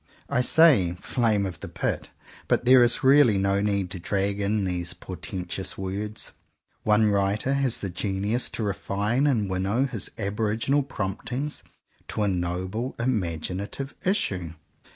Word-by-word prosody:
I 125 - +2
say 125 - +5
"flame 110 -5 +1
of 90 -4 -5
the - - -7
Pit;" - - -3 0.4
but - - +1
there 125 0 +7
is 120 - +2
really 135 -5 +6
no 100 +1 +1
need 100 -3 0
to 90 - -3
drag 100 +3 0
in 100 0 0
these 90 -2 -3
portentous 95 +1 -5
words. 100 +3 -4 0.5
One 105 0 +3
writer 100 +6 +1
has 135 -3 +1
the 100 - -3
genius 100 +6 -1
to 115 - -2
refine 105 +6 0
and 115 -8 +1
winnow 95 +7 0
his 125 -7 -4
aboriginal 110 +6 0
promptings 125 +3 -4 0.5
to 105 - -1
a - - +2
noble 95 +6 -2
imaginative 100 - -2
issue. 95 - 0
105 Hz, 140 wpm, -26 LUFS, 95-120 Hz, 0.5 s, there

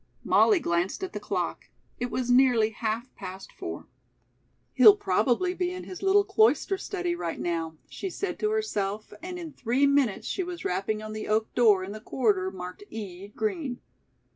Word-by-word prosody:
Molly 415 -5 +5
glanced 175 - -1
at 380 - -4
the - - -3
clock. - - -3 0.3
It 245 - -2
was 245 +1 -1
nearly 245 -4 +5
half 225 +3 -3
past 190 0 -8
four. - - -7 0.9
"He'll 415 - +9
probably 245 - +1
be 360 -1 -1
in 365 0 -6
his 365 - -8
little 395 +1 +4
cloister 400 0 +3
study 360 -2 -3
right 170 - -4
now," 165 -2 -2
she 385 - -5
said 370 0 -4
to 425 - +1
herself, 215 - -2
and 360 +1 -6
in 330 -4 -7
three 255 +2 +1
minutes 280 -7 +2
she - - -1
was 355 -1 -6
rapping 200 +4 -1
on 215 0 -6
the 215 - -5
oak 215 +1 0
door 210 -6 +5
in 190 - -6
the 215 - -7
corridor 205 -7 +1
marked 180 - -8
"E. 195 -3 -7
Green." 305 - -3
245 Hz, 175 wpm, -27 LUFS, -, 0.9 s, He'll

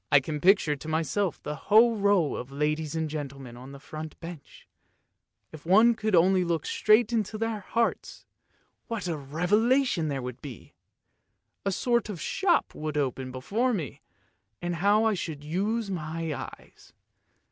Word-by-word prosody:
" - - -46
I 145 - +8
can 150 +2 -5
picture 185 -5 +4
to 145 - -10
myself 160 +3 -1
the 150 - -3 0.2
whole 225 +2 +6
row 200 -7 +2
of 125 +2 -6
ladies 150 +2 -1
and 160 -1 -1
gentle 145 -3 -5
men 125 -3 -10
on 130 +3 -11
the 140 - -10
front 155 +2 -8
bench, 165 -3 -11 0.8
if 155 -2 -11
one 215 +7 +6
could 215 -3 0
only 185 +2 +4
look 170 -3 -1
straight 215 +2 +3
into 215 -1 -1
their 225 -1 -2
hearts 230 +4 -2 0.3
— - - -42
what 230 -5 -3
a 170 - -1
revelation 180 - +1
there 135 -3 -3
would 125 -1 -7
be! 135 -6 -10 0.9
A - - +2
sort 235 +2 0
of 195 -5 -5
shop 360 - +1
would 155 -1 -4
open 130 -2 -2
before 215 - -1
me, 155 - -5 0.6
and 175 -1 -3
how 205 +5 +3
I 220 -1 +3
should 160 -6 -5
use 200 +7 -1
my 165 -2 -3
eyes - - -10
170 Hz, 170 wpm, -27 LUFS, 150-210 Hz, 0.9 s, I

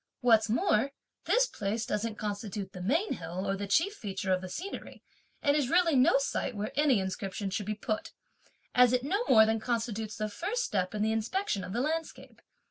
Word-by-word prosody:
What's 225 -3 +4
more, 230 +3 +2 0.3
this - - +4
place 220 - -3
doesn't 215 +1 -2
constitute 205 -2 -4
the 180 - -7
main 315 - +1
hill 175 +4 -5
or 195 - +1
the 200 +1 -4
chief 335 - +2
feature 195 - -2
of 185 - 0
the 185 - -7
scenery, 370 - -7 0.4
and 285 -1 +3
is 285 -5 +1
really 340 -2 +4
no 260 +1 +5
site 275 -3 -2
where 205 +1 -3
any 280 -6 +4
inscription 195 +1 -3
should 205 +1 -3
be 215 - -1
put, 215 +9 -3 0.6
as 250 0 +6
it 250 0 +2
no 400 - 0
more 220 -3 +8
than 220 0 +1
constitutes 225 -2 -2
the 215 -1 -2
first 405 - -2
step 185 - -1
in 210 - 0
the 220 - +2
inspection 225 - -1
of 180 - -6
the 235 +5 -1
landscape. 320 +3 -4
220 Hz, 200 wpm, -30 LUFS, 200-275 Hz, 0.6 s, more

